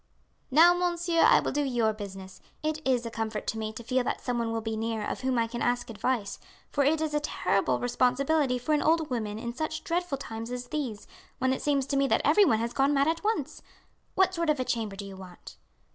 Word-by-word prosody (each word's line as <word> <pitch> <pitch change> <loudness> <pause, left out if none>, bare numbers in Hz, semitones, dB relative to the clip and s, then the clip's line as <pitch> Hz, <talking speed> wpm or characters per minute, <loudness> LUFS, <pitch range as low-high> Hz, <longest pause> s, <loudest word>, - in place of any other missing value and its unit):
"Now, 325 +6 +7
monsieur, 345 -1 0
I - - +6
will - - -2
do 295 - 0
your 240 -5 +1
business. 195 -2 -9 0.2
It 310 0 -1
is 250 -2 +1
a 230 - -4
comfort 220 -1 -3
to 225 - -2
me 215 0 -3
to 235 - -8
feel 255 +2 +1
that - - -1
some 245 -1 -2
one 230 -1 -1
will 225 - -1
be 220 0 -3
near 220 -1 -2
of - - -4
whom 260 -1 0
I 230 - +3
can 235 +1 -6
ask 245 -1 0
advice, 220 -2 -2 0.3
for 285 - +2
it 305 +3 +2
is 310 -1 -1
a 295 - +2
terrible 295 - 0
responsibility 255 +3 +1
for 250 +5 -1
an 300 - +2
old 320 -2 +2
woman 215 -4 -2
in 235 +1 -5
such 310 +4 -4
dreadful 355 -5 -1
times 230 -3 -6
as 245 0 -5
these, 250 -9 -4 0.3
when 260 -1 +1
it - - -4
seems 280 -2 +1
to 275 0 -1
me 275 0 +3
that - - +2
everyone 305 - +5
has 230 +2 -2
gone 275 +2 +2
mad 280 +1 +3
at 330 +2 -1
once. 315 -9 -2 0.5
What 380 -1 +3
sort 335 -3 -1
of 300 - +2
a 255 - -1
chamber 220 -5 -2
do 200 0 -7
you 195 -1 -9
want?" 185 -2 -12
255 Hz, 235 wpm, -28 LUFS, 225-305 Hz, 0.5 s, Now